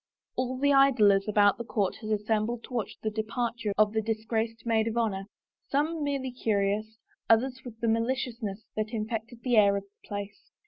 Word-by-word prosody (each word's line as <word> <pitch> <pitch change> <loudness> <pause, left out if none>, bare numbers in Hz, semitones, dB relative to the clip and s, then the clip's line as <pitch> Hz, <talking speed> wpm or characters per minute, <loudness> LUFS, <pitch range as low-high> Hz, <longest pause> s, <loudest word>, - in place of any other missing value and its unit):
All 255 0 -1
the 285 +2 +3
idlers 220 -8 +5
about 205 0 +4
the - - -2
court 210 -4 -1
had 215 - -7
assembled 215 +2 0
to - - -11
watch 235 -4 -3
the 215 - 0
departure 225 0 -2
of 215 0 +4
the 220 - +1
disgraced 225 +1 -2
maid 225 -1 +2
of 225 +1 -2
honor, 200 -4 0 0.4
some 300 +3 0
merely 275 -3 -2
curious, 215 -2 -1 0.3
others 255 +3 +3
with 230 -3 -10
the 230 - +1
maliciousness 230 -2 -1
that 215 +2 -2
in 215 -1 -1
fected 230 +1 -5
the 245 -3 +2
air 200 -1 +6
of 200 - -4
the 200 +1 -25
place. 205 0 -6
225 Hz, 185 wpm, -28 LUFS, 210-245 Hz, 0.4 s, air